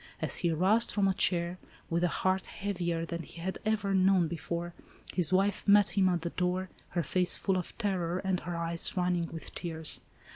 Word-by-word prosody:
As -, -, +1 dB
he 175 Hz, -, +1 dB
arose 190 Hz, +8 st, +3 dB
from 200 Hz, -2 st, +1 dB
a 190 Hz, -, +2 dB
chair, 175 Hz, -1 st, +1 dB, 0.3 s
with 170 Hz, +1 st, 0 dB
a -, -, +4 dB
heart 185 Hz, +2 st, 0 dB
heavier 175 Hz, -5 st, -2 dB
than 170 Hz, 0 st, -4 dB
he 165 Hz, -, -11 dB
had 190 Hz, +3 st, -4 dB
ever 210 Hz, -2 st, +1 dB
known 185 Hz, -2 st, +4 dB
before, 170 Hz, +1 st, -4 dB, 0.4 s
his 175 Hz, -3 st, +1 dB
wife 195 Hz, +3 st, +1 dB
met 205 Hz, 0 st, +6 dB
him 190 Hz, -2 st, +3 dB
at 175 Hz, -2 st, 0 dB
the 170 Hz, 0 st, -3 dB
door, 180 Hz, +1 st, -1 dB, 0.2 s
her 175 Hz, -1 st, -1 dB
face 180 Hz, +2 st, +2 dB
full 195 Hz, -, 0 dB
of 180 Hz, -2 st, -4 dB
terror, 180 Hz, -5 st, -1 dB
and 190 Hz, -1 st, -1 dB
her 175 Hz, +2 st, -5 dB
eyes 170 Hz, +2 st, +1 dB
running 180 Hz, -2 st, +1 dB
with 165 Hz, -1 st, -8 dB
tears. 160 Hz, -3 st, -2 dB
180 Hz, 195 wpm, -30 LUFS, 170-190 Hz, 0.4 s, met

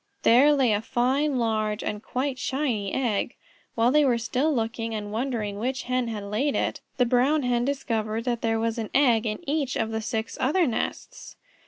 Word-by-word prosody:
There 265 Hz, +6 st, +6 dB
lay 265 Hz, -6 st, +3 dB
a 205 Hz, -, 0 dB
fine, 260 Hz, +4 st, +1 dB
large, 215 Hz, -2 st, 0 dB
and 210 Hz, 0 st, -3 dB
quite 255 Hz, +2 st, -3 dB
shiny 255 Hz, -7 st, -1 dB
egg. 240 Hz, -3 st, -1 dB, 0.4 s
While 230 Hz, +2 st, +3 dB
they 300 Hz, +1 st, +5 dB
were 250 Hz, -4 st, +3 dB
still 255 Hz, +6 st, 0 dB
looking 225 Hz, -3 st, -2 dB
and 205 Hz, -1 st, -5 dB
wondering 220 Hz, -4 st, -2 dB
which 255 Hz, +3 st, -2 dB
Hen 250 Hz, -1 st, -1 dB
had 215 Hz, -3 st, -4 dB
laid 215 Hz, +9 st, -1 dB
it, -, -, -1 dB, 0.2 s
the 250 Hz, -, +4 dB
Brown 260 Hz, +5 st, +2 dB
Hen 245 Hz, -1 st, +1 dB
discovered 230 Hz, -5 st, -2 dB
that 240 Hz, -1 st, -2 dB
there 225 Hz, -1 st, +1 dB
was 230 Hz, +1 st, -1 dB
an 220 Hz, -, -4 dB
egg 240 Hz, -5 st, +4 dB
in 220 Hz, +11 st, -5 dB
each 285 Hz, -3 st, -1 dB
of 225 Hz, 0 st, -1 dB
the 220 Hz, 0 st, -2 dB
six 220 Hz, 0 st, -4 dB
other 330 Hz, +7 st, +3 dB
nests. 240 Hz, -6 st, -4 dB
240 Hz, 190 wpm, -26 LUFS, 220-265 Hz, 0.4 s, There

